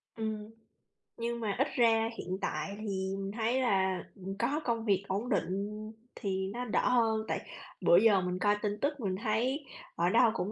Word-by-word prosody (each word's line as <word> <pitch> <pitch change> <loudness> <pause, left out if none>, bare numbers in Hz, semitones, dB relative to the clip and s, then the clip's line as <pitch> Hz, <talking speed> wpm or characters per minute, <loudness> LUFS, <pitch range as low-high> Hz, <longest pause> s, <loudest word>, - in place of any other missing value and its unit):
Ừm. 220 -1 -4 0.7
Nhưng 235 0 -2
mà 215 -3 -1
ít 270 - +3
ra 225 -2 +4
hiện 185 +1 -3
tại 155 +5 -2
thì 195 -2 -2
mình 195 0 -3
thấy 235 +4 0
là 190 -5 +2
mình 195 +1 -6
có 275 +7 +1
công 230 -1 0
việc 195 -2 +2
ổn 205 +6 -2
định 195 -4 +1 0.6
thì 190 -3 -2
nó 245 +1 -3
đỡ 220 - +1
hơn, 225 -3 +2
tại - - -3 0.3
bữa 170 - +6
giờ 205 -2 +5
mình 180 0 -2
coi 205 +2 +3
tin 210 0 -1
tức 290 0 0
mình 195 -5 -1
thấy 250 +7 0 0.3
ở 170 +1 +2
đâu 230 +2 +5
cũng 205 -2 -2
215 Hz, 190 wpm, -31 LUFS, 195-235 Hz, 0.7 s, bữa